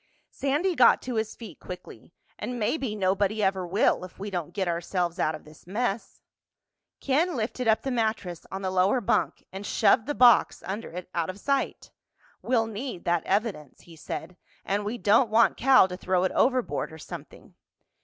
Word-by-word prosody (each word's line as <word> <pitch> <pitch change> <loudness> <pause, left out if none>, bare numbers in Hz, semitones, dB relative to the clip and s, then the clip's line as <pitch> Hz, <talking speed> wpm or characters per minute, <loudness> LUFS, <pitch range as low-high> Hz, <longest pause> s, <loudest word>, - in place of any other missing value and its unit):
Sandy 295 +7 0
got 255 -7 +6
to 255 - -4
his 220 -1 -2
feet 215 -9 -11
quickly. 180 -1 -10 0.3
"And 245 - -4
maybe 235 0 -1
nobody 200 +2 +1
ever 190 -2 0
will, 190 +1 +2
if 185 - -10
we 200 +1 -6
don't 175 -5 -3
get 195 -3 -2
ourselves 175 0 -2
out 155 0 +1
of 155 - -12
this 155 +2 -17
mess." 220 +2 -3 0.8
Ken 320 +6 +1
lifted 235 +1 -2
up 220 0 +3
the 270 - -2
mattress 220 -7 -2
on 195 +1 -5
the 185 - -1
lower 190 +7 +3
bunk 220 - 0
and 195 +1 -6
shoved 220 +3 +3
the 290 - -2
box 240 -3 +5
under 200 +5 -5
it 180 +1 -7
out 170 -1 -1
of 185 +2 -6
sight. 275 +4 -2 0.5
"We'll 235 -3 +1
need 225 -2 -6
that 170 -2 +1
evidence," 195 - -2
he 170 - -15
said, 175 +3 -7 0.3
"and 205 +1 -1
we 220 +4 -3
don't 230 +2 +4
want 225 +1 +4
Cal 260 -6 +5
to 180 - -6
throw 185 -1 0
it 185 - +1
overboard 255 -8 +1
or 160 - -10
something." - - -11
205 Hz, 185 wpm, -27 LUFS, 185-240 Hz, 0.8 s, got